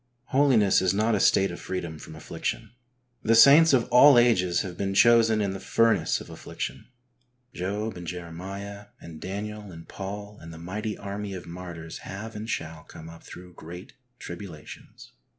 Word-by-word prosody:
Holiness 130 -8 +4
is 95 0 +1
not 110 +3 +1
a 105 - +1
state 95 0 +3
of - - -8
freedom 85 -4 -5
from 80 - -11
affliction. 75 - -5 0.5
The 115 +1 +3
saints 145 +7 +8
of 125 -4 +2
all 135 +1 +7
ages 90 -8 +3
have 90 -3 -6
been 95 +1 -3
chosen 115 -1 +5
''in 100 -2 -1
the 95 - -6
furnace 115 +3 +1
of - - -11
affliction.'^ - - -7 0.7
Job 105 +4 -3
and 90 -1 -9
Jeremiah 95 +4 -7
and 80 -2 -11
Daniel 105 +2 -6
and 80 -1 -12
Paul 100 +2 -7
and 80 - -10
the 80 - -10
mighty 105 +6 -5
army 100 0 -6
of 90 - -8
martyrs 85 -2 -8
have 110 +4 -8
and 110 +2 -6
shall 80 -4 -5
come 80 0 -12
up 85 - -14
through 90 0 -12
great 90 +3 -11 0.2
tribulations. 85 - -11
100 Hz, 170 wpm, -26 LUFS, 85-110 Hz, 0.7 s, saints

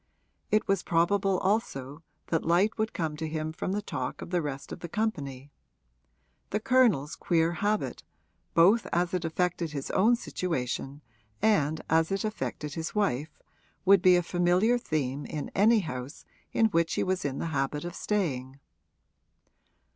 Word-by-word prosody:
It 215 - +2
was 195 -2 +2
probable 190 +3 +2
also 160 - -1 0.3
that 165 - +1
light 180 +7 +3
would 220 0 0
come 160 -3 -2
to 160 +1 -3
him 155 0 -3
from 180 - -3
the 205 +1 -2
talk 130 -9 -4
of - - -10
the 175 -1 +1
rest 140 -3 -5
of - - -6
the 170 - -7
company: 145 - -3 1.0
the 210 - 0
Colonel's 230 - +3
queer 165 -1 +1
habit, 205 +4 -1 0.5
both 195 +7 +5
as 175 +2 0
it 180 -2 -1
affected 170 -1 -1
his 140 -2 -4
own 220 +6 +4
situation 145 - -3 0.4
and 160 -8 +2
as 160 +2 +2
it 195 0 0
affected 155 -8 -4
his 160 +5 -5
wife, 155 -8 -1 0.5
would 195 -1 +6
be 185 -1 +6
a 175 - +2
familiar 180 +8 +2
theme 145 - -2
in 150 -2 -4
any 215 +2 +5
house 125 -4 -7 0.3
in 225 - +3
which 165 -3 +1
he - - +1
was 185 -1 -1
in 140 -2 -2
the 165 - -3
habit 140 +3 -1
of 175 - -5
staying. 140 -12 -2
170 Hz, 160 wpm, -28 LUFS, 150-200 Hz, 1.0 s, would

